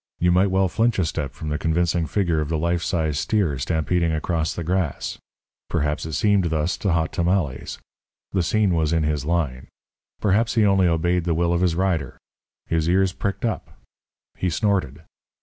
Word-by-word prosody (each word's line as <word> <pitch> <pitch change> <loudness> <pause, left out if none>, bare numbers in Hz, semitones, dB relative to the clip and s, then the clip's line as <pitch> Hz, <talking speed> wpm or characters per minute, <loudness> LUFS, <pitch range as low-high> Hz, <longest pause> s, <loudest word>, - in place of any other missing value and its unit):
You 90 0 +2
might 90 +3 +4
well 95 0 +2
flinch 115 +5 +1
a 95 - +2
step 75 -3 -3
from 75 - -5
the 75 0 -2
convincing 85 0 +1
figure 85 -1 0
of 75 - -3
the 80 - 0
life 85 +2 0
size 80 -5 -1
steer 85 - 0
stampeding 80 +5 0
across 80 +1 -1
the 85 - -4
grass. 90 -3 -2 0.5
Perhaps 75 +1 -1
it 80 - -6
seemed 105 -2 +2
thus 80 0 0
to 95 -4 0
Hot 80 -2 0
Tamales. 85 -6 -1 0.5
The 95 - +1
scene 100 +2 +2
was 80 -1 +1
in 80 -1 +2
his 75 -2 -1
line. 75 -7 -1 0.5
Perhaps 110 +4 +1
he 110 -2 +4
only 95 -2 +4
obeyed 85 +1 +1
the 85 -2 +1
will 85 +1 +1
of 85 - +1
his 90 -3 +2
rider. 95 -2 -1 0.5
His 80 0 0
ears 95 +1 +2
pricked 100 +4 -3
up; 115 - -4 0.6
he 90 - -1
snorted. 85 - -1
85 Hz, 185 wpm, -23 LUFS, 80-95 Hz, 0.6 s, might